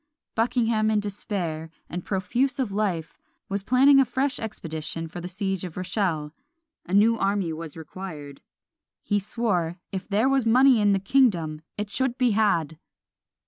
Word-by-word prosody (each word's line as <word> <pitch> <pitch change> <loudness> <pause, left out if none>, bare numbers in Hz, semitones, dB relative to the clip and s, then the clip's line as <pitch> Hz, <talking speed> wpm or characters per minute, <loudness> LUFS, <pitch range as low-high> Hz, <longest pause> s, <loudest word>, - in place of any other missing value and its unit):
Buckingham 225 -1 +1
in 215 -1 +2
despair, 185 -6 -3 0.2
and 175 +1 -5
profuse 240 +8 0
of 255 -7 -1
life, 195 -6 -2 0.3
was 200 0 -1
planning 265 +6 +5
a - - +7
fresh 270 +2 -1
expedition 165 -6 -4
for 175 +2 -8
the 175 - -5
siege 190 0 -3
of 180 -3 -7
Rochelle; 180 -5 -1 0.5
a 180 - -5
new 225 +3 +4
army 195 -4 0
was 160 0 -7
required. 155 -4 -8 0.6
He 205 - +1
swore, 185 -5 -1
"if 190 -2 -5
there 215 +5 +2
was 270 -1 +3
money 250 +1 +5
in 205 -1 +4
the 195 - +2
kingdom 185 - +2 0.2
it 210 0 -4
should 260 +1 0
be 250 -3 +3
had!" 170 -8 +1
200 Hz, 155 wpm, -25 LUFS, 170-230 Hz, 0.6 s, a